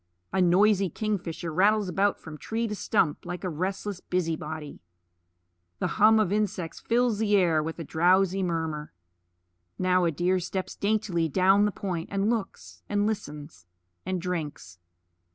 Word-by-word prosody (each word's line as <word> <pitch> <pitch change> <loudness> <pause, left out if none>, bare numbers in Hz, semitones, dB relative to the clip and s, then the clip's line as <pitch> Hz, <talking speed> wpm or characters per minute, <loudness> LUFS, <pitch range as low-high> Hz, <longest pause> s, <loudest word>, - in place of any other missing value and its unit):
A 190 - +2
noisy 195 +2 +4
kingfisher 175 -4 -3
rattles 205 +4 +3
about 195 +2 +1
from 160 -2 -9
tree 230 +1 -2
to 210 - -4
stump, 185 -7 0
like 175 0 -6
a 185 - -1
restless 190 +4 -3
busy 175 -3 -1
body. 155 -1 -7 1.0
The 205 - -3
hum 220 +1 +7
of 205 -4 +1
insects 205 -5 -2
fills 235 -2 +1
the 210 -2 +2
air 170 -5 +3
with 160 +1 -5
a 165 - -5
drowsy 185 +5 +2
murmur. 160 -4 -3 0.8
Now 185 -1 +2
a 170 - +2
deer 180 +4 +1
steps 185 +1 -4
daintily 200 -6 0
down 190 +6 +4
the 210 - +1
point, 180 -5 -4
and 200 +2 +1
looks, 220 -5 -5
and 205 0 +1
listens, 150 - -5 0.4
and 185 0 -2
drinks. 155 - -5
185 Hz, 155 wpm, -27 LUFS, 165-205 Hz, 1.0 s, hum